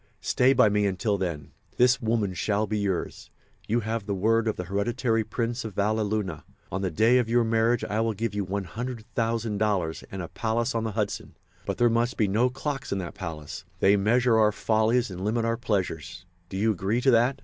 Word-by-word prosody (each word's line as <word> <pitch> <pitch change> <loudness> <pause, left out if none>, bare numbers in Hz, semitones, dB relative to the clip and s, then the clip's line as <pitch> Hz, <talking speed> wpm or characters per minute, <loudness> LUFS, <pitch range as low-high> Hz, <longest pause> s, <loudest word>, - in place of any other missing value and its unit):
Stay 125 +1 +3
by 125 -4 +5
me 105 0 +2
until 100 +2 0
then. 85 -7 -4 0.3
This 125 0 +4
woman 110 -4 0
shall 105 +4 0
be 105 0 -2
yours. 95 -3 -3 0.4
You 120 +2 +1
have 110 -1 -3
the 100 - -1
word 115 +4 +2
of 110 - 0
the 90 - -4
hereditary 110 +4 0
Prince 115 +3 -3
of 110 -4 -7
Valleluna. 105 -4 0 0.3
On 95 - -2
the 95 - 0
day 110 +9 +4
of 115 -2 -1
your 120 +1 +3
marriage 115 +1 +2
I 110 +2 -1
will 115 -1 0
give 115 0 -2
you 105 -1 -1
$100,000 105 -2 -2
and 95 - -5
a - - -5
palace 115 +3 -1
on 115 -1 -1
the 110 - -3
Hudson. 105 -1 -3 0.3
But - - -2
there 120 - +4
must 120 +2 +1
be 110 - +2
no 110 +6 +2
clocks 135 +1 -4
in 100 - 0
that 90 -3 -5
palace—they 90 +2 -1
measure 115 +3 +3
our 105 -1 +5
follies 110 +2 +1
and 90 +1 -6
limit 115 +3 0
our 115 0 +1
pleasures. 90 -7 -3 0.2
Do 95 - -5
you 110 +3 +2
agree 100 +4 0
to 135 - +4
that?" 120 +3 +3
110 Hz, 200 wpm, -26 LUFS, 100-115 Hz, 0.4 s, by